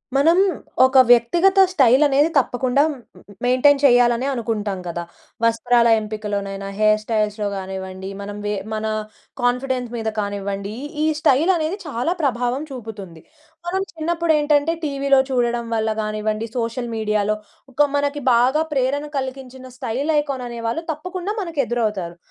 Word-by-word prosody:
మనం, 325 +5 +4 0.5
ఒక 260 0 +6
వ్యక్తిగత 345 - +4
స్టైల్ 265 -4 +5
అనేది 285 +3 +3
తప్పకుండా, 255 +1 +2
మ్ - - -10 0.5
మెయింటైన్ 255 +3 +4
చేయాలనే 245 -1 +4
అనుకుంటాం 215 -6 -2
కదా! 170 0 -4 0.4
వస్త్రాల 235 +1 +3
ఎంపికలోనైనా, 205 -2 -4
హెయిర్ 215 0 +4
స్టైల్స్‌లో 215 -1 -1
కానివ్వండి, 190 0 -6
మనం 205 +1 -6
వె 205 0 -1 0.2
మన 215 0 -3 0.6
కాన్ఫిడెన్స్ 250 0 0
మీద 225 -1 -2
కానివ్వండి, 200 0 -3 0.3
ఈ - - +3
స్టైల్ 310 +5 +3
అనేది, 325 +3 -2
చాలా 280 +5 -1
ప్రభావం 250 0 0
చూపుతుంది. 210 -9 -9 0.5
మనం 380 +2 -1
చిన్నప్పుడు 335 0 0
ఏంటంటే, 295 +2 +2
టీవీలో 275 -2 +2
చూడడం 240 -2 0
వల్ల 220 0 0
కానివ్వండి, 215 +1 -2
సోషల్ 235 +1 -2
మీడియాలో, 215 -1 0 0.4
ఒక 290 +3 +3
మనకి 285 0 -1
బాగా 255 +6 +3
ప్రేరణ 275 +2 0
కలిగించిన, 260 -1 -6
స్టైల్ 265 +7 -2
ఐకాన్ 275 -3 -3
అనేవాళ్ళు 235 +6 -3
తప్పకుండా, 365 +5 -5
మనకు 335 -6 -1
ఎదురవుతారు. 210 -7 -2
245 Hz, 130 wpm, -21 LUFS, 215-285 Hz, 0.6 s, ఒక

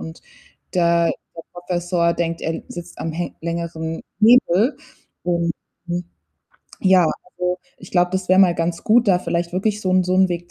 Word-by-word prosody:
und 80 +1 -9 0.5
der 170 -1 +3 0.2
der 165 - -7
Professor 175 -1 -1
denkt, 170 -1 -2
er 165 0 -3
sitzt 175 0 -9
am 160 - -3
hä 175 +2 -4
längeren 165 -1 -4 0.2
Hebel. 230 - +5 0.5
Und, 170 -1 0 0.3
hm, 175 0 -3 0.8
ja, 185 -2 +5
also, 180 +2 -3 0.2
ich 180 - -13
glaube, 180 -1 +2
das 185 -1 -2
wäre 185 +1 +5
mal 175 -3 +5
ganz 170 0 -2
gut, 235 +1 +4
da 180 -2 +5
vielleicht 170 -1 -2
wirklich 210 +3 -1
so 185 - 0
'n 185 0 +4
so 185 - 0
'n 190 0 +4
Weg 175 0 -4
175 Hz, 170 wpm, -21 LUFS, 170-185 Hz, 0.8 s, Hebel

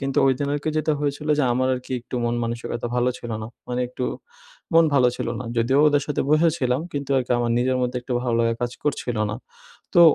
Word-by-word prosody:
কিন্তু 135 -1 -3
ঐদিন 135 +1 +1
আরকি 145 +2 -2
যেটা 155 0 +1
হয়েছিল 145 +1 -2
যে - - +3
আমার 130 +1 +1
আরকি 125 +1 -7
একটু 125 - -9
মন 120 0 0
মানসিকতা 115 0 -3
ভালো 125 +1 +2
ছিল 120 - -7
না। 110 - -4 0.2
মানে 125 0 -1
একটু 125 0 -4 0.7
মন 165 0 +7
ভালো 125 -3 +5
ছিল - - -3
না। - - -5
যদিও 125 +4 +3
ওদের 145 -1 +2
সাথে 150 - -1
বসে 160 +2 +5
ছিলাম 125 +1 +1
কিন্তু 140 -1 -4
আরকি 125 -1 -1
আমার 120 -1 0
নিজের 130 +1 +1
মধ্যে 125 0 -1
একটু 125 - -5
ভালো 120 -2 0
লাগা 115 0 +2
কাজ 120 - -1
করছিলো 120 -6 -1
না। 105 - -3 0.6
তো 175 - +7
130 Hz, 220 wpm, -23 LUFS, 120-145 Hz, 0.7 s, মন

